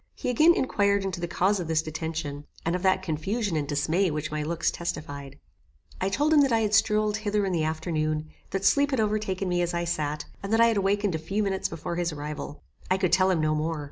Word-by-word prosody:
He - - -2
again 315 +8 +5
inquired 200 -5 +1
into 185 -3 -3
the 175 - -1
cause 190 +4 +1
of 175 - -4
this 160 -1 +1
detention, 155 -2 -4 0.2
and 165 +2 +1
of 180 - -2
that 190 0 +2
confusion 190 +4 -2
and 150 -2 -1
dismay 160 +6 +1
which 155 0 -3
my 155 0 -2
looks 165 +2 0
testified. 145 -5 -5 0.7
I 190 - +1
told 295 +10 +2
him 300 - +7
that 275 -2 +3
I 225 -1 +3
had 210 -1 0
strolled 215 -1 +3
hither 210 -1 0
in 190 - -1
the 165 -2 +1
afternoon, 155 -1 -1 0.2
that 195 +1 -2
sleep 285 +5 +4
had 265 -4 0
overtaken 210 -3 0
me 175 -1 +1
as 175 0 -1
I 170 - 0
sat, 155 -3 -2 0.2
and 195 - -5
that 225 - +3
I 230 0 +6
had 225 - 0
awakened 200 0 +1
a 160 - -1
few 195 +7 -1
minutes 190 -1 -1
before 165 +1 -5
his 175 -1 0
arrival. 145 -1 -6 0.3
I 185 - +3
could 185 -2 0
tell 185 0 +4
him 175 -4 +2
no 155 0 +2
more. 155 +1 -1
180 Hz, 235 wpm, -27 LUFS, 155-205 Hz, 0.7 s, him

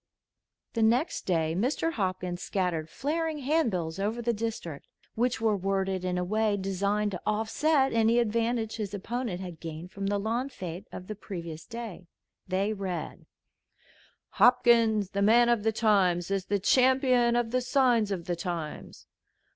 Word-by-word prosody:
The 230 - -1
next 240 +8 +1
day 160 -3 +1
Mr. 260 - 0
Hopkins 185 - -2
scattered 175 -5 -2
flaring 315 - -2
hand 295 0 +1
bills 170 -2 -3
over 215 +4 -1
the 235 0 0
district 210 -9 -5 0.3
which 245 +1 0
were 220 -2 +2
worded 195 -1 -1
in 180 0 -1
a 180 - 0
way 215 +2 +1
designed 200 +2 0
to 180 - -5
offset 265 +7 +1
any 230 +1 +3
advantage 230 0 0
his 205 -2 -4
opponent 210 -2 -3
had 175 -4 -8
gained 165 +2 -7
from 195 0 -4
the 205 0 +1
lawn 230 +6 -1
fête 185 -5 -7
of 180 - -8
the 215 - -5
previous 170 -6 -8
day. 230 -7 -7 0.4
They 195 +3 0
read: 190 -4 -5 1.0
"Hopkins, 230 -5 +4
the 200 - -1
Man 235 +4 +5
of 235 -3 +3
the 220 +1 +1
Times, 195 -5 +2
is 195 -2 -1
the 205 - 0
Champion 250 +2 +3
of 240 -1 0
the 255 +1 +1
Signs 245 -4 +2
of 175 -4 -3
the 175 - -1
Times. 170 -3 -6
210 Hz, 160 wpm, -28 LUFS, 185-235 Hz, 1.0 s, Man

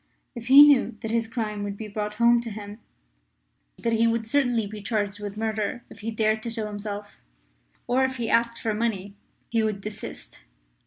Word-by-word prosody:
If 235 -2 -8
he 275 +3 +10
knew 285 -6 +4
that 220 - -4
his 230 -1 0
crime 215 -3 -3
could 200 0 -4
be 220 - -6
brought 210 0 -4
home 235 +1 +4
to 235 - -6
him; 205 0 -8 1.0
that 230 - -1
he 230 +1 +3
would 230 0 0
certainly 245 -3 +1
be 210 +1 -8
charged 205 -1 -2
with 205 0 -6
murder 220 +2 -2
if - - -12
he 225 - -4
dared 215 -1 +1
to 235 - -4
show 225 -1 -2
himself, 205 0 -6 0.6
or 255 +2 +2
if 260 0 0
he 235 -3 -3
asked 235 +1 +2
for 220 - -1
money, 210 -3 -2 0.4
he 225 -1 +1
would 215 -2 -1
desist. 205 - -8
220 Hz, 195 wpm, -25 LUFS, 210-235 Hz, 1.0 s, he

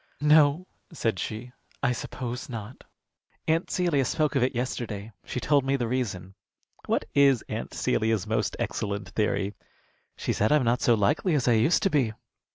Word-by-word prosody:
"No," 150 +2 +5 0.3
said 115 - -1
she, 115 +3 -5 0.3
"I 125 - +3
suppose 125 +1 -5
not. 115 0 -7 0.6
Aunt 165 +2 +1
Celia 170 -7 +1
spoke 150 +3 0
of 135 - +3
it 125 +1 +1
yesterday. 115 -4 -3
She - - -3
told 140 +1 +2
me 135 +1 +1
the 120 -4 -1
reason." 100 -7 -3 0.5
"What - - +1
is 140 -4 +4
Aunt - - -4
Celia's 110 -3 +1
most - - -1
excellent 100 0 -3
theory?" 105 -2 0 0.6
"She - - -1
said 110 - +1
I'm 150 -3 +4
not 120 +1 +2
so 120 - +4
likely 145 - +1
as 135 -4 0
I - - +5
used 115 +10 +3
to 195 - +2
be." 130 -7 +2
125 Hz, 165 wpm, -27 LUFS, 110-145 Hz, 0.6 s, No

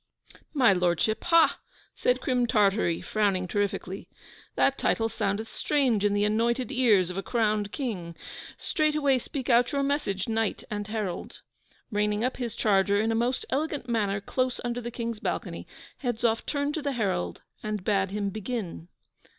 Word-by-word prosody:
'My 250 -7 +6
Lordship, 180 +4 +1
ha!' 335 -1 +5 0.3
said - - +1
Crim 250 -4 +1
Tartary, 200 -6 +2
frowning 200 -4 0
terrifically. 200 -1 -2 0.5
'That - - +2
title 225 - +1
soundeth 210 +1 -1
strange 260 -9 +1
in 205 0 +2
the 205 0 +2
anointed 235 +4 +1
ears 215 -9 +3
of 180 - -7
a - - 0
crowned 215 -2 0
King. 185 - -4 0.4
Straightway 300 -4 +2
speak 265 +1 -5
out 240 0 +4
your 280 -1 +1
message, 275 -9 -1
Knight 225 -2 -1
and 205 -1 -3
Herald!' 210 -5 -4 0.5
Reining 210 +1 +1
up 255 - -1
his 240 -4 -4
charger 200 -1 +3
in 220 +2 +1
a - - +1
most 240 +3 0
elegant 295 -2 -1
manner 205 -4 0
close 255 +5 -1
under 240 0 -2
the 240 - -4
King's 230 -2 -4
balcony, - - -4 0.3
Hedzoff 235 -3 0
turned 285 0 -1
to 315 - -2
the 285 -1 -1
Herald, 190 - -1 0.2
and 210 -3 -3
bade 195 -1 +1
him 200 0 -2
begin. 215 -5 -4
220 Hz, 160 wpm, -27 LUFS, 200-250 Hz, 0.5 s, My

